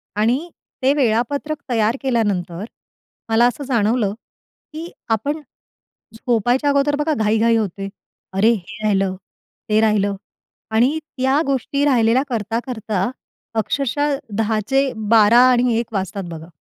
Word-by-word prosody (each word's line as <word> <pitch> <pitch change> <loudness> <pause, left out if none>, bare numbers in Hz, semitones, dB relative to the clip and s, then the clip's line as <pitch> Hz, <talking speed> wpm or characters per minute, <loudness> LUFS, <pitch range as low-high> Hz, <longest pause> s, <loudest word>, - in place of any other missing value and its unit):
आणि 245 +11 +1 0.3
ते 270 +2 +4
वेळापत्रक 280 +4 0
तयार 225 0 +1
केल्यानंतर, 205 -8 -1 0.6
मला 225 +2 +4
असं 245 +4 -3
जाणवलं 230 -4 +1 0.6
की 325 +3 -7 0.2
आपण 290 +8 -3 0.7
झोपायच्या 245 +4 +1
अगोदर 280 +1 +2
बघा, 295 +2 0
घाई-घाई 225 -1 +2
होते. 195 -2 -3 0.4
"अरे! 205 +4 +4
हे 215 +1 -7
राहिलं, 195 -3 +1 0.5
ते 215 0 +4
राहिलं" 205 -2 +2 0.6
आणि 250 +8 +2
त्या 270 -1 0
गोष्टी 275 +1 0
राहिलेल्या 245 -2 +3
करता-करता 225 -3 -2 0.5
अक्षरशः 280 +6 0
अ, - - -5 0.2
10:00चे 225 +5 +1 0.2
12:00 225 +1 +6
आणि 245 -2 +2
1:00 230 -1 -5
वाजतात 195 0 -3
बघा. 160 -1 -8
230 Hz, 120 wpm, -20 LUFS, 210-270 Hz, 0.7 s, 12:00